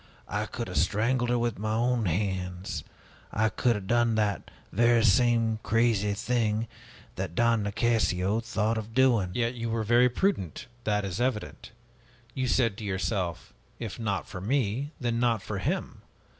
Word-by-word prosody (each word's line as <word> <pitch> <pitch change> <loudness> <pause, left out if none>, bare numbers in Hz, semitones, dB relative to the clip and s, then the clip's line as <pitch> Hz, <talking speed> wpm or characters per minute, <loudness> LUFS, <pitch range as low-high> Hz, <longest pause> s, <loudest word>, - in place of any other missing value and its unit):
I - - -2
could - - -5
have - - -4
strangled 120 +7 +1
her 120 - +2
with 120 -4 -1
my 110 +1 -1
own 120 0 +1
hands! 90 0 -2 0.5
I 110 +1 +2
could 120 +2 +1
have 100 -2 -5
done 120 +1 +2
that 105 -2 0 0.2
very 120 +2 +4
same 115 0 +3
crazy 110 -2 +2
thing 115 -1 0 0.5
that 90 -2 -4
Don 115 0 +3
Nicasio 100 -2 +1
thought 110 -1 -1
of 110 +1 -9
doing!" 120 -8 +4
"Yet 120 0 +1
you 115 -1 -4
were 115 0 -1
very 120 +3 +4
prudent, 125 - -1 0.2
that 105 -1 +1
is 95 +3 -3
evident. 125 -4 -2 0.6
You 130 +1 -1
said 115 -5 +2
to 110 - -7
yourself: 95 -3 -2 0.2
'If 115 -1 -6
not 100 -5 -2
for 90 - -7
me, 125 +3 0
then 120 -2 -1
not 115 -4 +1
for 100 -1 -4
him!' 95 - -3
110 Hz, 160 wpm, -28 LUFS, 100-120 Hz, 0.6 s, very